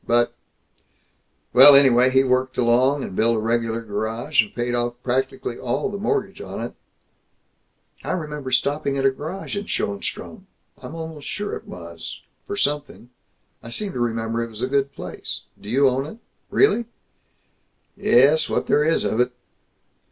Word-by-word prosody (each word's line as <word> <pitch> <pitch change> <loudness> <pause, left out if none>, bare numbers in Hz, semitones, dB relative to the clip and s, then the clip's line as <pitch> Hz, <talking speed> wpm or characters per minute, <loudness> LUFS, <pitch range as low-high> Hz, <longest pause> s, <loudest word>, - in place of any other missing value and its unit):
But 120 0 +3 1.2
Well, 145 - +10
anyway, 130 -2 +6
he 130 +1 +4
worked 130 0 0
along, 130 +4 +3
and 95 - -6
built 115 +3 +3
a - - 0
regular 115 +1 0
garage, 110 +2 0
and 105 - -7
paid 120 0 -1
off 120 0 -1
practically 130 -1 -2
all 135 +8 -1
the 200 0 -5
mortgage 415 - -1
on - - -6
it - - -5 0.7
" - - -34
"I - - -2
remember 150 -6 -4
stopping 140 +2 0
at 135 - 0
a 135 - +5
garage 160 +11 -6
in 200 +1 -3
Schoenstrom, 100 0 -4 0.3
I'm 165 - -9
almost 160 -3 -7
sure 205 0 -4
it - - -10
was, - - -8 0.3
for 405 0 -4
something. 145 - -2 0.5
I 115 - -10
seem 195 - -3
to - - -4
remember 115 -1 -1
it 115 - -6
was 110 +1 -8
a - - +1
good 140 +1 0
place. - - -6 0.2
Do 100 - -9
you 135 +4 +4
own 135 +2 0
it? 215 - -10 0.3
Really?" 400 - +3 1.1
"Ye - - -4
es, 150 +3 +3
what - - 0
there 150 - +3
is 160 +2 +2
of 110 - -1
it." 125 0 +2
130 Hz, 170 wpm, -22 LUFS, 120-150 Hz, 1.2 s, Well